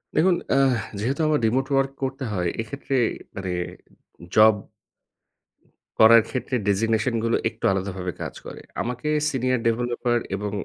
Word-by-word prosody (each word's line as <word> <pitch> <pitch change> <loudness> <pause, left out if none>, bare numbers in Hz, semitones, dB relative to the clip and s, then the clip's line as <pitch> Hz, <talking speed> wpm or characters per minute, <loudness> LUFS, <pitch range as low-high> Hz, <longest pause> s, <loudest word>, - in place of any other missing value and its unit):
দেখুন 180 +2 +4 0.2
আহ 135 -3 +3 0.2
যেহেতু 130 +8 -1
আমার 150 -1 +2
remote 130 +4 +1
work 135 0 +2
করতে 135 0 -3
হয়, 90 -3 0
এক্ষেত্রে 135 +4 -4 0.4
মানে 95 -1 -4 0.8
job 110 0 +8 1.5
করার 115 +1 +8
ক্ষেত্রে 130 0 -3
designation 110 +4 +1
গুলো 115 - +2
একটু - - -7
আলাদাভাবে 95 -2 -3
কাজ - - -4
করে। - - -9 0.2
আমাকে 125 +4 -4 0.2
senior 130 -2 0
developer 120 +1 0 0.2
এবং 105 +1 -4
120 Hz, 130 wpm, -24 LUFS, 110-135 Hz, 1.5 s, job